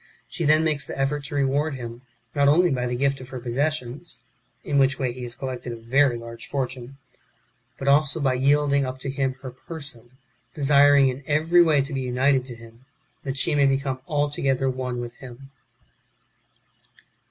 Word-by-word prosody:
She 170 - -4
then 155 +2 +4
makes 150 -3 0
the - - -6
effort 140 +1 -1
to 145 - -7
reward 140 +2 +1
him, 120 -1 -8 0.3
not 140 -1 +3
only 170 +4 +4
by 125 -2 -1
the 125 - -2
gift 135 +1 0
of 130 - -11
her 130 - -6
possessions 130 +3 -3 0.5
(in 140 -1 +1
which 135 0 +3
way 130 -3 -1
he 125 +1 -9
has 120 -1 -2
collected 130 -2 -5
a - - -5
very 120 +3 +2
large 115 0 -9
fortune), 135 -1 -4 0.8
but 135 - -6
also 145 +2 +3
by 135 -3 +1
yielding 140 +2 +2
up 130 0 -4
to 135 - -3
him 135 -1 -1
her 130 - -6
person, 130 -3 -5 0.4
desiring 145 -1 +5
in 130 +2 -5
every 160 +4 +4
way 155 -5 +4
to 140 +2 -7
be 135 - -2
united 130 +1 +1
to 125 -2 -7
him, 115 +2 -16 0.4
that 135 -1 -3
she 160 +4 +2
may 140 -1 +4
become 135 -1 -1
alto 145 -1 -1
gether 135 -1 +1
one 125 -1 -4
with 120 0 -7
him. 130 +1 -12
135 Hz, 185 wpm, -24 LUFS, 125-145 Hz, 0.8 s, desiring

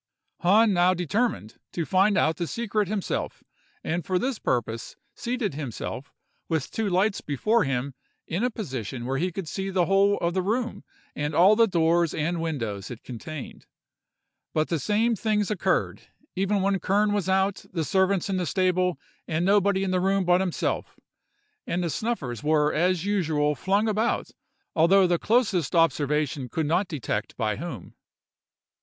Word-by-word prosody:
"Hahn 210 +4 +4
now 180 +1 +4
determined 180 - -1
to 170 - -2
find 195 +3 +3
out 160 0 +2
the 170 - -2
secret 215 -2 -1
himself, 205 -1 -3 0.4
and 170 +2 -2
for 185 +4 0
this 255 +3 -2
purpose 115 -1 -2 0.2
seated 240 - -2
himself, 135 -1 -6 0.4
with 160 -5 -1
two 220 -2 -1
lights 195 +3 +1
before 215 - +1
him, 135 0 -2 0.3
in 180 +7 -2
a 250 - +2
position 130 - -5
where 135 +2 -1
he 180 +2 0
could 180 -1 -5
see 195 +4 -3
the 185 -2 +2
whole 195 +3 +3
of 170 0 -1
the 190 - +1
room 220 +1 -2 0.3
and 145 +1 -2
all 190 +5 +6
the 230 +1 +5
doors 170 -2 +2
and 165 +2 -1
windows 115 -12 -3
it 120 -2 -9
contained;—but 155 +3 -8
the 165 - 0
same 220 - +1
things 210 -1 0
occurred, 210 - 0 0.3
even 195 +1 +1
when 195 0 +1
Kern 205 +4 +2
was 200 -3 -1
out, 190 +1 +1
the 165 -3 -1
servants 190 +3 +2
in 195 -1 -1
the 180 -2 -1
stables, 185 -2 +1 0.3
and 165 +2 0
nobody 200 0 +3
in 190 - -1
the 185 -1 +1
room 195 0 +1
but 180 +1 +4
himself; 185 -3 -2 0.7
and 175 +1 -1
the 170 - -1
snuffers 140 - -3
were 150 0 +2
as 180 +2 +1
usual 160 -7 +1
flung 195 - +1
about, 220 +2 0 0.4
although 185 +4 +5
the 175 -1 +1
closest 205 - +1
observation 150 -4 +1
could 160 +6 -1
not 175 +6 +1
detect 115 -9 -4
by 110 -3 -1
whom. 135 - -7
180 Hz, 160 wpm, -26 LUFS, 155-200 Hz, 0.7 s, all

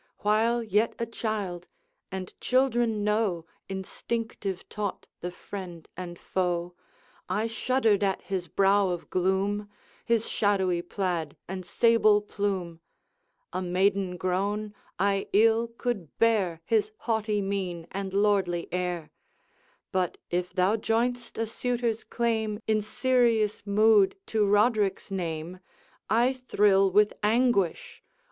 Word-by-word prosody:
While 225 +3 +2
yet 215 +1 +1
a 235 - -1
child, 210 -6 -4 0.4
and 190 -1 -5
children 240 -4 +2
know, 210 -5 0 0.2
Instinctive 195 0 -4
taught, 210 -2 -4
the 175 - -4
friend 180 -2 -8
and 175 -1 -7
foe, 175 -1 -1 0.6
I 215 - 0
shuddered 225 -2 +1
at 195 -1 0
his 185 -1 -3
brow 195 +2 +3
of 175 -1 -5
gloom, 195 +3 0 0.3
His 230 -1 +1
shadowy 190 -4 +1
plaid 175 -5 -3
and 185 0 -5
sable 215 +2 +4
plume; 195 -5 -3 0.7
A - - -1
maiden 185 0 +1
grown, 200 +4 -1 0.2
I 195 0 +1
ill 225 +3 +4
could 230 - -4
bear 200 -8 +2
His 215 0 +1
haughty 220 -2 0
mien 190 -4 -3
and 195 0 -4
lordly 195 -4 +1
air: 180 -3 -2 0.8
But, 185 -2 0
if 180 +1 -1
thou 185 +4 +2
join'st 235 +3 -1
a 225 - 0
suitor's 235 0 -1
claim, 220 -3 -1
In 215 -1 +2
serious 230 -2 +1
mood, 210 -1 +5
to 215 -2 +1
Roderick's 205 -1 +2
name. 170 -1 -4 0.5
I 240 +4 +3
thrill 205 -6 +3
with 210 +2 +4
anguish! 215 -4 +1
205 Hz, 120 wpm, -27 LUFS, 185-225 Hz, 0.8 s, mood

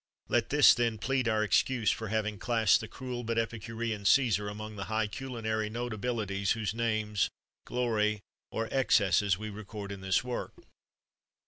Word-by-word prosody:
Let 120 -1 +1
this, 145 0 +7
then, 115 -2 0
plead 130 +2 0
our 110 -1 +2
excuse 110 +2 +2
for 110 - -4
having 105 -1 -1
classed 115 -4 +3
the - - -6
cruel 125 -2 -6
but 115 0 -2
epicurean 115 -1 -2
Cæsar 105 -2 +3
among 110 +1 -7
the 100 -1 -5
high 110 0 0
culinary 110 -2 -3
notabilities 110 -4 -1
whose 110 -2 -2
names, 110 -3 0 0.4
glory, 110 -4 0 0.3
or 115 - -2
excesses 100 -7 +3
we 105 +1 -6
record 105 -1 -7
in 100 -1 -7
this 95 +3 +1
work. 125 -1 -4
110 Hz, 150 wpm, -30 LUFS, 105-120 Hz, 0.4 s, this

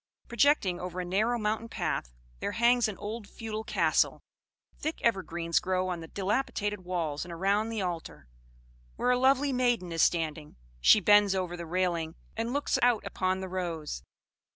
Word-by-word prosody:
"Projecting 235 -8 +2
over 180 0 -5
a 180 - -2
narrow 215 +7 +1
mountain 220 +1 -2
path - - -2 0.3
there - - -3
hangs 240 0 +4
an 210 - -5
old 215 0 -6
feudal 220 0 -6
castle. - - +1 0.6
Thick 315 +1 -3
evergreens 170 -7 +1
grow 185 +1 -1
on 175 -2 -3
the 165 - -8
dilapidated 205 +1 -1
walls, 165 -5 -2
and 175 - -9
around 200 +6 +1
the 220 -3 -2
altar, 170 - -5 0.7
where 250 - +1
a 250 - +2
lovely 270 +2 +3
maiden 245 -8 +1
is 165 -1 0
standing: 155 -3 0 0.2
she 135 - +7
bends 205 0 +5
over 180 -2 -2
the 170 -1 -7
railing 170 -2 -1 0.2
and 230 +2 -2
looks 285 +2 0
out 245 -3 +3
upon 185 0 -1
the 190 - -4
rose. 170 - -4
190 Hz, 165 wpm, -29 LUFS, 175-230 Hz, 0.7 s, she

